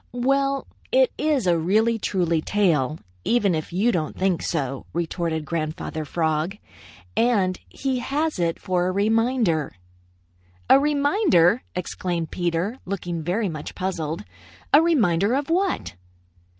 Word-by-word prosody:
"Well, 275 +2 +1 0.3
it - - +4
is 300 -7 +1
a 170 -2 +3
really 220 +7 +2
truly 175 -6 0
tail, 155 -8 +1 0.3
even 210 -6 +2
if 155 -1 -3
you 200 +7 +2
don't 160 -6 -2
think 185 -3 +1
so," 135 -5 -3
retorted 165 -2 -2
Grandfather 155 -1 -3
Frog, 160 +4 -1 0.6
"and 200 -6 +2
he 265 -2 -2
has 295 - -1
it 170 -1 0
for 180 -1 0
a - - +1
reminder." 220 - +1 0.9
"A 270 - +7
reminder!" 285 - +3
exclaimed 175 -2 -3
Peter, 175 +7 -1
looking 175 -3 -4
very 190 +7 0
much 155 -4 -6
puzzled. 170 -4 -3 0.5
"A 295 - +8
reminder 225 - +2
of 285 +3 -2
what?" 375 - 0
185 Hz, 125 wpm, -24 LUFS, 165-245 Hz, 0.9 s, A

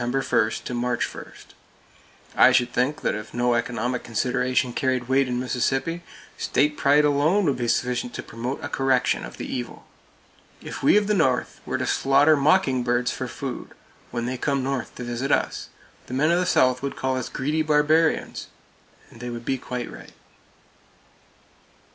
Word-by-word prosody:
1 120 0 -1 0.5
to - - -4
March 120 0 -1
1! - - -9 1.0
I - - +7
should 120 -1 +2
think 140 +5 0
that - - 0
if 105 +2 -7
no 120 0 +2
economic 120 +1 -1
consideration 125 +1 0
carried 130 -3 -1
weight 135 +1 +3
in 125 -1 -2
Mississippi, 135 +6 -1 0.4
state 150 +2 +1
pride 145 +2 +4
alone 150 +8 +2
would 140 -5 +1
be 120 -1 -2
sufficient 125 0 0
to - - -5
promote 120 +4 -5
a - - -2
correction 135 -2 +1
of - - -9
the - - -5
evil. 125 -1 -6 0.7
If - - -8
we - - +5
of 210 - +2
the 210 - +1
North 135 -10 0
were - - -1
to - - -2
slaughter 140 +3 +4
mockingbirds 130 -6 +2
for 130 - -4
food, 125 +1 -6 0.3
when 120 -1 -3
they 125 +1 -3
come 140 -2 0
North 135 -1 -3
to 125 - -6
visit 120 +3 -3
us, - - 0 0.4
the 125 - -5
men 150 +5 +3
of 175 - +3
the 180 - 0
South 130 -6 +3
would 140 0 -3
call 130 0 -1
us 130 -2 -3
greedy 150 +4 -1
barbarians; 155 +1 +2 0.6
and 115 - -15
they 120 0 -5
would 120 0 -7
be 135 +1 -1
quite 125 0 -5
right. - - -12
130 Hz, 170 wpm, -24 LUFS, 120-145 Hz, 1.0 s, I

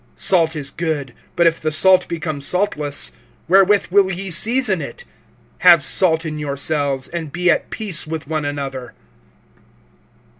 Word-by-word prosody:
(50)Salt 165 -4 +2
is 145 -2 -5
good; 150 -7 -4 0.2
but 170 - +2
if 165 0 +2
the 155 - -1
salt 185 +4 +3
become 160 -4 -5
saltless, 150 -3 -1 0.4
wherewith 195 +2 +4
will 195 0 +3
ye 190 +1 -4
season 220 0 +2
it? 130 -5 -8 0.6
Have 170 -4 +6
salt 165 +2 +2
in 155 -1 -5
yourselves, 140 -1 -1
and 165 -3 -6
be 175 +2 +1
at - - -1
peace 195 -8 -1
with 160 -2 -6
one 155 -1 -2
another. 135 -4 -5
160 Hz, 145 wpm, -19 LUFS, 145-185 Hz, 0.6 s, Have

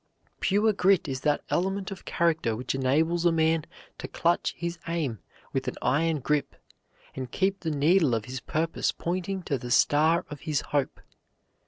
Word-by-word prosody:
Pure 210 +3 +2
grit 190 -3 +3
is 130 -2 -3
that 150 -1 +1
element 190 +2 -1
of 195 - -8
character 160 -9 +1
which 125 +3 -3
enables 155 +6 +1
a 175 - +4
man 160 -1 +2 0.4
to - - -5
clutch 170 +1 0
his 170 0 -4
aim 155 - -2 0.3
with - - -2
an - - -2
iron 155 +4 +1
grip, 145 +1 -1 0.6
and 130 -2 -5
keep 195 0 0
the 165 - -3
needle 150 -2 +3
of 110 -2 -3
his 130 +2 -5
purpose 165 +5 -1
pointing 185 +2 -3
to 140 -5 -1
the 120 - -7
star 155 +6 +3
of 145 - -6
his 150 -3 -1
hope. 145 -2 -2
160 Hz, 170 wpm, -27 LUFS, 140-175 Hz, 0.6 s, a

